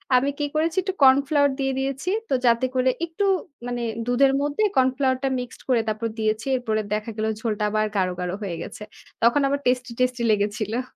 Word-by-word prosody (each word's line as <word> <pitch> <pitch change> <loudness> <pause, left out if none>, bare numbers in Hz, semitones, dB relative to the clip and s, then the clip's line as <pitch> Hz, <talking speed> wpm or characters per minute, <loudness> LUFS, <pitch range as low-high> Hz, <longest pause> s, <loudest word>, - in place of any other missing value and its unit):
আমি 270 +3 +3
কি 295 - +1
করেছি 325 +3 0
একটু 380 -1 -2
cornflower 280 +2 +5
দিয়ে 270 0 0
দিয়েছি। 275 +6 -2 0.2
তো - - 0
যাতে 235 +2 +4
করে 255 0 +3 0.2
একটু 335 +5 -4 0.4
মানে 245 -1 -3 0.2
দুধের 270 +2 +3
মধ্যে 290 +8 0
cornflower 260 0 +2
টা - - +2
mixed 245 -1 -8
করে 240 -3 +4
তারপর 215 +1 -1
দিয়েছি। 220 +1 0
এরপরে 220 -3 -1
দেখা 215 +2 -2
গেল 215 - -1 0.2
ঝোলটা 215 -2 -1
আবার 215 0 +1
গাঢ়, 185 -2 +2
গাঢ় 180 0 -2
হয়ে 180 -4 -3
গেছে। - - -8 0.4
তখন 240 +5 +4
আবার 280 +1 0
টেস্টি, 250 0 +1
টেস্টি 250 -1 +1
লেগেছিল। 215 +3 0
250 Hz, 185 wpm, -24 LUFS, 220-275 Hz, 0.4 s, cornflower